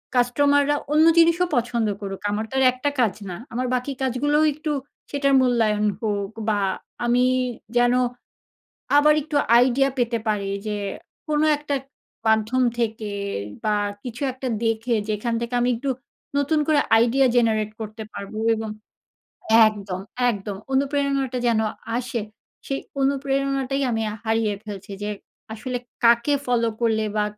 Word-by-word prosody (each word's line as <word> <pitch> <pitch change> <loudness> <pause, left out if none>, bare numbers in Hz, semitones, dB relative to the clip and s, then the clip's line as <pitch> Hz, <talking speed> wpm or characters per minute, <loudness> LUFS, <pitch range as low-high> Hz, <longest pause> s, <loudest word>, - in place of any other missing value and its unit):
কাস্টমাররা 285 +4 +3 0.2
অন্য 310 +1 +5
জিনিসও 335 +2 +5
পছন্দ 235 -2 0
করুক, 195 -1 -5
আমার 215 +2 -1
তো - - -5
আর - - +4
একটা 255 +3 -1
কাজ 225 -6 +3 0.2
না। 180 - -5 0.2
আমার 250 +2 -1
বাকি 250 +3 -2
কাজগুলোও 290 +4 +2
একটু 305 +1 -4 0.4
সেটার 280 -1 +1
মূল্যায়ন 225 -4 +2 0.2
হোক 205 -2 -2 0.2
বা 210 -1 +1 0.5
আমি 245 +1 +3 0.5
যেন 245 0 +4 1.0
আবার 300 +1 +6
একটু 305 0 -6 0.2
আইডিয়া 260 +2 +4
পেতে 235 -1 +1
পারি। 205 -2 0 0.2
যে 210 - -1 0.5
কোনো 300 0 +2
একটা 290 -1 -3
ক - - -30 0.4
মাধ্যম 220 +4 +2 0.2
থেকে 220 -2 -2 0.5
বা 210 -1 +2 0.3
কিছু 245 0 -7
একটা 260 +1 -6 0.2
দেখে। 225 +1 0
যেখান 215 +3 -1
থেকে 235 +1 -4
আমি 245 - +2
একটু 270 +4 -3 0.5
নতুন 285 +2 +2
করে 305 -2 +4 0.2
আইডিয়া 245 +4 +4
জেনারেট 220 -3 +2
করতে 220 +1 -6
পারবো 200 +2 -7 0.2
এবং 220 0 -4 1.0
একদম, 200 -4 -4 0.3
একদম 205 -2 -4 0.2
অনুপ্রেরণাটা 275 -1 0
যেন 230 -2 +3 0.4
আসে। 240 -2 -3 0.5
সেই 275 - -1 0.2
অনুপ্রেরণাটাই 275 0 0
আমি 225 -1 0
আ - - -5
হারিয়ে 220 -1 +1
ফেলছি। 205 -1 -8
যে 210 - -2 0.4
আসলে 250 +3 -4 0.3
কাকে 235 +4 +4
ফলো 235 -2 +2
করলে 220 -2 +2
বা 210 - +3
240 Hz, 140 wpm, -23 LUFS, 220-275 Hz, 1.0 s, আবার